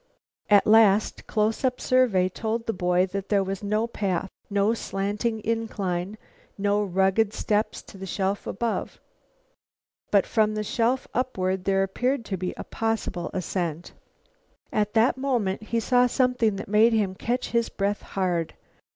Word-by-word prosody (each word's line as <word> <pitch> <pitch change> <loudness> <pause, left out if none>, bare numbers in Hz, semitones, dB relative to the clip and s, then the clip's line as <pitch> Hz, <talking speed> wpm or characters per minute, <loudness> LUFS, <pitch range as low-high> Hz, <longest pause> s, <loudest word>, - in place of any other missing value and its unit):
A 205 -2 +6
last, 215 -1 +4
close 220 +2 0
up 255 -1 +1
survey 240 -8 +3
told 225 +4 -3
the 225 - -1
boy 180 0 +2
that 195 +1 -5
there 200 -2 +3
was 195 0 -4
no 215 +2 0
path, 195 -5 -2 0.2
no 205 +2 +2
slanting 210 +1 -2
incline, 205 -4 -2 0.4
no 205 +1 +1
rugged 195 +3 +2
steps 210 +1 -1
to 195 - -14
the 190 - -6
shelf 195 +2 -2
above. 230 +3 -3 1.1
But 200 -2 +4
from 215 -1 +1
the 215 - -1
shelf 235 +4 0
upward 190 -7 -1
there 195 0 +2
appeared 245 +6 -1
to 200 - -3
be 180 0 -4
a - - -5
possible 225 -5 -2
ascent. 175 -2 -3 0.8
At 210 +1 0
that 230 +4 +4
moment 240 -9 -1
he 230 +1 0
saw 245 +2 +3
something 250 -4 +1
that 195 - -6
made 215 +3 +4
him 205 -4 +1
catch 240 +6 -2
his 235 -1 +1
breath 200 +1 -1
hard. 175 -4 -2
210 Hz, 150 wpm, -25 LUFS, 190-225 Hz, 1.1 s, A